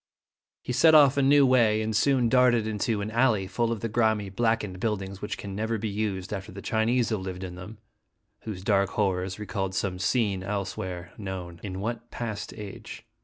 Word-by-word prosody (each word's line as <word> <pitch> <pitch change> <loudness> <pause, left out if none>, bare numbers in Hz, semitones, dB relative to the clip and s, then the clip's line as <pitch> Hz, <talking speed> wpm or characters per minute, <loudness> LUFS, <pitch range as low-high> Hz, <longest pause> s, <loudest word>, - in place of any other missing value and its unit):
He 125 - -3
set 160 +5 +6
off 145 -3 +7
a 140 - +2
new 140 +1 +6
way, 115 -4 +4
and 110 0 -2
soon 130 +2 +3
darted 120 -2 +4
into 110 0 -1
an 105 +2 -4
alley 115 -4 +2
full 115 +4 -1
of 115 - -3
the 115 - -1
grimy, 110 -2 +1
blackened 105 -2 -1
buildings 100 -3 -3
which 105 - -4
can 100 -1 -7
never 110 +2 -1
be 110 +1 -3
used 100 -2 -3
after 95 -1 -5
the 95 - -9
Chinese 115 +3 +1
have 110 -3 -1
lived 95 0 -6
in 90 -1 -6
them, 90 +5 -9 0.6
whose 100 -5 -7
dark 100 -2 +2
horrors 95 -2 -1
re 105 - -6
called 95 -2 -3
some 95 -2 -2
scene 100 -1 +1
elsewhere 95 -2 -4
known 90 -4 -6
in 95 -2 -5
what 120 +2 -4
past 105 -3 -5
age? 105 -3 -9
105 Hz, 195 wpm, -27 LUFS, 95-115 Hz, 0.6 s, off